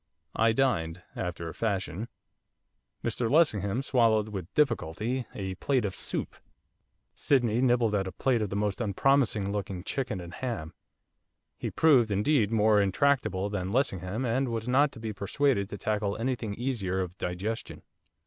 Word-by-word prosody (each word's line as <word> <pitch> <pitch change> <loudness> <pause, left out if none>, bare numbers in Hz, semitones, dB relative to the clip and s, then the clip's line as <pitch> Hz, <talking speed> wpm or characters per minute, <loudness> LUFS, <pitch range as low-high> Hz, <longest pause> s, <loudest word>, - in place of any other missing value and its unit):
I 115 0 +4
dined, 90 -9 0
after 85 -2 -4
a 80 - -6
fashion; 100 -1 -2 1.0
Mr 115 -2 -1
Lessingham 125 - +2
swallowed 115 -5 +3
with 95 -5 -6
difficulty, 120 - 0
a 95 -2 -3
plate 125 +5 0
of 95 - -2
soup; - - -4 0.8
Sydney 120 -4 +2
nibbled 120 -4 +3
at 95 -2 0
a - - -4
plate 125 +3 +1
of 105 - -1
the 100 - -4
most 105 +2 -1
unpromising 110 -1 +2
looking 95 -3 -4
'chicken 125 -4 -2
and 85 0 -9
ham,' 90 -11 -4 0.8
he - - -4
proved, 135 -8 +4
indeed, 105 +2 +2
more 110 -1 +4
intractable 100 -2 +1
than 95 -2 -2
Lessingham, 110 -2 0
and 125 +2 0
was 115 0 -3
not 140 +3 +4
to - - -10
be 110 -1 -4
persuaded 100 +1 0
to 105 - -6
tackle 105 -1 -1
anything 115 -3 -2
easier 105 -7 -1
of 90 -1 -5
digestion. 95 +6 -4
110 Hz, 150 wpm, -28 LUFS, 95-125 Hz, 1.0 s, I